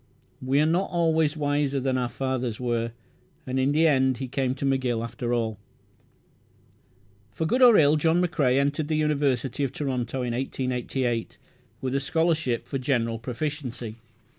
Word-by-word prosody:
We 130 +2 +1
are 150 - +4
not 170 +5 +1
always 160 -3 +1
wiser 145 -1 0
than 130 0 0
our 125 -1 0
fathers 130 -2 -2
were, 120 -2 -1 0.5
and 130 0 -2
in 130 +2 +2
the 155 +3 +3
end 130 -4 +3
he 130 - -4
came 130 0 -1
to 140 - -4
McGill 130 -4 0
after 120 +1 -4
all. 110 -3 -1 1.7
For 160 - -3
good 250 +11 +1
or 240 -4 +8
ill, 150 0 +5
John 160 +3 +2
McCrae 145 -7 +2
entered 145 +2 0
the 155 - 0
University 140 -3 0
of 135 - -1
Toronto 130 -2 -2
in 120 -1 -2
1888, 125 -2 -2 0.4
with 130 -1 -2
a 140 - +2
scholarship 160 -4 0
for 135 - -3
"general 115 -4 0
proficiency". 125 -2 -5
135 Hz, 160 wpm, -26 LUFS, 125-150 Hz, 1.7 s, or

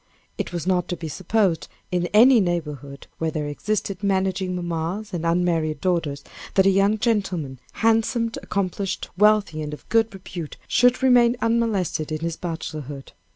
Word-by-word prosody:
It - - -2
is 175 -3 -4
not 180 -2 +1
to 175 - -3
be 165 - -6
supposed, 185 +2 0 0.2
in 175 -1 0
any 235 +6 +6
neighborhood 150 - -3
where 160 - 0
there 155 -1 -3
existed 195 +5 -3
managing 190 -2 0
mammas 175 +4 -3
and 170 -1 -2
unmarried 165 -3 +1
daughters, 165 -6 -1 0.3
that 190 -1 +5
a 195 - +6
young 200 +3 +3
gentleman, 190 - -1
handsome, 225 +1 +1
accomplished, 195 0 -2
wealthy, 210 -5 +3
and 150 0 -4
of - - -21
good 225 0 +3
repute, 180 -4 -8
should 245 +1 +3
remain 245 -2 +5
unmolested 225 -10 0
in 155 0 -3
his 165 -1 -2
bachelorhood. 155 -5 -6
180 Hz, 155 wpm, -23 LUFS, 160-210 Hz, 0.3 s, any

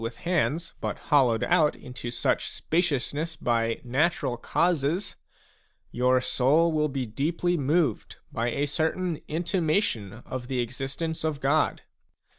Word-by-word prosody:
with 115 +1 -4
hands 170 -1 0
but - - -2
hollowed 130 -7 +3
out 150 -2 +3
into 125 -1 -7
such 120 - 0
spaciousness 160 -1 -1
by 115 -3 0
natural 135 0 +1
causes, 170 - 0 0.8
your 125 +1 +3
soul 145 +6 +3
will 150 -1 +1
be 135 -2 -2
deeply 165 +9 0
moved 150 - 0 0.2
by 115 +1 -1
a 140 +5 0
certain 160 +3 -1
intimation 160 - 0
of 130 -1 -5
the 130 -1 -2
existence 135 +7 -3
of 155 -3 -1
God. 145 +3 +1
145 Hz, 125 wpm, -27 LUFS, 125-165 Hz, 0.8 s, hollowed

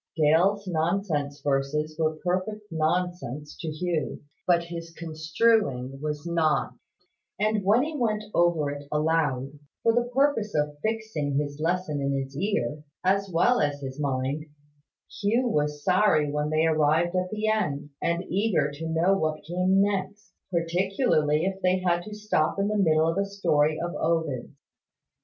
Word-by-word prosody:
Dale's 175 +7 +3
nonsense 160 -4 -1
verses 145 +3 -1
were 155 -1 +1
perfect 190 +4 -2
nonsense 160 -3 -2
to 165 - -5
Hugh: 160 +1 -2 0.3
but 170 -1 +4
his 170 -1 -7
construing 160 - 0
was 150 0 -3
not: 165 -2 +1 0.7
and 215 0 +1
when 215 +6 +4
he 310 +1 -4
went 215 -5 0
over 170 -4 +2
it 145 0 -8
aloud, 150 -3 0 0.2
for 230 - +4
the 240 +1 +1
purpose 255 - +1
of 150 -1 -1
fixing 220 -11 -2
his 145 0 -2
lesson 165 -2 -1
in 140 0 0
his 135 0 -6
ear, 150 - -1 0.2
as 195 +1 +2
well 240 +9 +3
as 145 -1 0
his 135 +1 -6
mind, 140 +2 -1 0.7
Hugh 230 +5 +2
was 150 -7 -1
sorry 160 -7 +3
when 150 0 -1
they 155 +1 +2
arrived 160 +2 +2
at 185 0 0
the 215 +1 -2
end, 150 -10 -1
and 170 +1 0
eager 185 -7 +1
to 160 +3 -6
know 170 +4 +3
what 155 -4 -1
came 185 +4 +2
next, 200 0 -3 0.2
particularly 170 - +1
if 195 0 -3
they 185 0 +3
had 175 -2 +1
to 210 - -7
stop 210 -7 0
in 200 +1 +1
the 215 - -1
middle 160 -5 +3
of 165 +4 0
a 200 - +1
story 155 -6 +1
of 175 0 -3
Ovid's. 160 -6 -1
165 Hz, 155 wpm, -26 LUFS, 150-195 Hz, 0.7 s, but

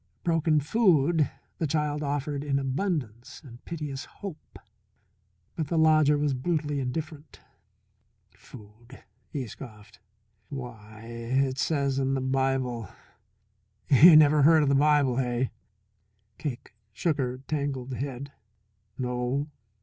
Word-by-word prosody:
Broken 165 -2 +2
food 160 - +2 0.3
the 160 - 0
child 150 0 -1
offered 145 0 -2
in 140 -2 0
abundance 135 - -3
and 120 -2 -13
piteous 150 -5 -5
hope. 195 -6 -10 1.0
But 160 -3 -3
the 165 - -1
lodger 155 -2 +4
was 145 -1 0
brutally 150 +1 -1
indifferent. 150 +3 -5 1.0
"Food," 115 +4 -15 0.3
he 135 -3 -4
scoffed. 110 -3 -12 0.5
"Why, 110 -5 -9
it 125 +3 -1
says 140 -4 0
in 135 0 0
the - - 0
Bible 130 -4 -1 1.0
you 155 +5 +9
never 150 -1 +6
heard 155 +2 +6
of 140 - +1
the - - +3
Bible, 140 -3 +3
hey?" 125 -1 -1 0.9
Cake 130 -7 -6 0.2
shook 150 +8 -1
her 125 -1 -1
tangled 140 -4 -3
head. 135 +1 -5 0.7
"No? 125 +3 -2
140 Hz, 115 wpm, -27 LUFS, 125-150 Hz, 1.0 s, you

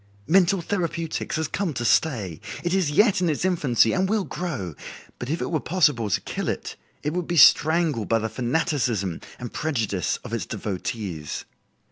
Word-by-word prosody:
Mental 185 +2 +4
therapeutics 170 -4 -2
has 160 -1 -1
come 175 -5 -2
to 120 - -2
stay. 105 - +1 0.2
It 175 0 0
is 190 -5 +2
yet 195 +5 +4
in 175 - +2
its 155 +3 -1
infancy 135 -11 +3
and 190 0 +1
will 215 -1 +1
grow, 140 - -4 0.5
but, 125 - -5
if 160 +3 -1
it - - -4
were 160 - +1
possible 150 - +2
to - - +1
kill - - -4
it, - - -4 0.3
it 150 - -1
would 180 -1 -2
be 175 - -1
strangled 155 - +5
by 115 - +4
the 110 0 -1
fanaticism 120 - -1 0.2
and 125 -2 -7
prejudice 115 - -1
of - - -8
its - - -2
devotees. 95 -5 -4
150 Hz, 175 wpm, -24 LUFS, 115-175 Hz, 0.5 s, strangled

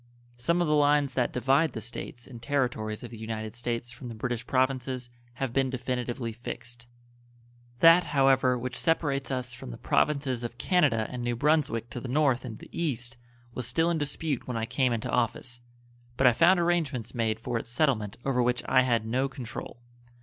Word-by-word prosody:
Some 170 +9 +1
of - - -1
the 150 - +2
lines 145 -2 +3
that 125 -2 +1
divide 135 +4 +2
the - - -4
States 120 +1 -6
and 120 -4 -11
Territories 125 -6 -1
of 120 - -8
the 115 - -9
United 110 -1 -5
States 120 0 -3
from 125 - -9
the 115 - -7
British 120 +1 -3
Provinces 130 -1 0 0.2
have 130 0 -3
been 135 0 +2
definitively 125 -2 -3
fixed. 120 0 -8 0.9
That, 165 +2 +8
however, 135 -3 +3
which 125 +1 -4
separates 145 -4 0
us 125 -2 -3
from 125 - -8
the - - -7
Provinces 140 -5 +1
of 120 0 -5
Canada 140 -10 +2
and 125 -1 -4
New 120 0 0
Brunswick 140 -4 +1
to 125 - -4
the 125 - -6
North 130 -1 +2
and 110 -3 -6
the - - -13
East 125 -7 -2 0.4
was 125 -2 -3
still 165 +8 +2
in 165 - 0
dispute 145 -1 -2
when 125 -2 -2
I 110 - -1
came 125 +2 +1
into 115 -2 -2
office, 120 0 -1 0.6
but 135 - +2
I 125 - +7
found 175 +7 +5
arrangements 155 -9 0
made 110 -2 0
for 115 0 -2
its 115 - -8
settlement 120 -6 0
over 130 -2 +2
which 125 0 +1
I 130 - +5
had 120 -4 +1
no 130 +4 0
control. 120 -2 -8
125 Hz, 190 wpm, -28 LUFS, 120-140 Hz, 0.9 s, That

